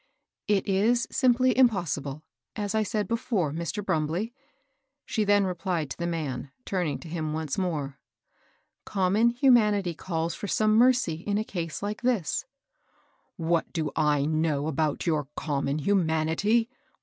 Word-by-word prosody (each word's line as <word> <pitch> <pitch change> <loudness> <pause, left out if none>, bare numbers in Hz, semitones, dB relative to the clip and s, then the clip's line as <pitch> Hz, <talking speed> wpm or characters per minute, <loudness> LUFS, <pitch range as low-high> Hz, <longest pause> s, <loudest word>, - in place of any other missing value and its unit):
^^ - - -42 0.5
It 195 - -4
is 220 +5 +2
simply 255 0 +3
impossible, 170 - +1 0.3
as 205 -2 -2
I 220 - +2
said 210 -1 -1
before, 225 - 0
Mr^ 170 +6 -4
BrumUey,'' 165 +9 -1 0.7
she 220 - 0
then 205 0 +4
replied 180 -5 -2
to - - -5
the 170 - -1
man, 140 -6 -3 0.2
turning 180 -6 -1
to - - -10
him 155 -2 -3
once 155 -2 -2
more. 150 -7 -2 0.8
^^ - - -55
Common 200 +4 +2
humanity 220 -7 +3
calls 165 0 -3
for 205 - -6
some 215 +3 +2
mercy 240 -8 +4
in 205 0 +1
a 215 - 0
case 170 -4 -5
like 210 +1 -3
this. 240 -5 0
^^ 275 +1 -41
What 165 0 0
do 160 -3 -1
I 150 -2 +2
know 155 -2 0
about 155 -1 -1
your 155 -5 0
* - - -53
common 140 -1 -1
human 160 -2 +1
ity 215 +8 +2
'? - - -39
180 Hz, 160 wpm, -27 LUFS, 155-215 Hz, 0.8 s, then